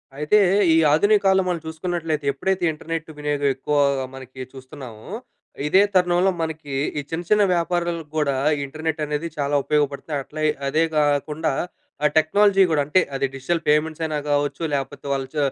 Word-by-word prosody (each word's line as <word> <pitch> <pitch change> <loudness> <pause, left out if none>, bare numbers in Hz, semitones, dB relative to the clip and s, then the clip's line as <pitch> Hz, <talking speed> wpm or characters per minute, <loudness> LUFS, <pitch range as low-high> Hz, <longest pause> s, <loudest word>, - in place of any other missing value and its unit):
అయితే 150 +8 +2 0.4
ఈ, - - +4 0.2
ఆధునిక 205 +7 +4
కాలంలో 190 -1 +4
మనం 170 -2 -1
చూసుకున్నట్లయితే, 160 -2 -3
ఎప్పుడైతే 190 +6 -1
ఇంటర్నెట్ 165 +1 -5
వినియోగం 145 -1 -1
ఎక్కువగా 140 0 +1
మనకి 130 0 -10
చూస్తున్నామో, 130 -4 -11 0.6
ఇదే 190 +6 +5
తరుణంలో 180 0 +3
మనకి 160 -3 -5 0.3
ఈ - - -2
చిన్న, 165 +1 -3
చిన్న 210 -1 +5
వ్యాపారాలకి 170 -2 -1
గూడా 145 -3 +1 0.3
ఇంటర్నెట్ 155 +3 -4
అనేది 150 +2 -3
చాలా 145 0 0
ఉపయోగపడుతాయి. 145 0 -1
అట్ల, 150 - -14 0.3
అదే 155 +4 +2
కాకుండా 150 +1 +1 0.5
ఆ - - +7
టెక్నాలజీ 195 +5 +4
కూడా 150 -2 +2
అంటే, 165 +6 +3
అది 135 0 0
డిజిటల్ 160 +6 -1
పేమెంట్స్ 155 +2 +1
అయినా 155 -1 -2
కావచ్చు 145 +2 0
లేకపోతే 140 +1 -4
వాళ్ళు 135 -1 -3
చ - - -4
150 Hz, 150 wpm, -22 LUFS, 145-170 Hz, 0.6 s, ఆ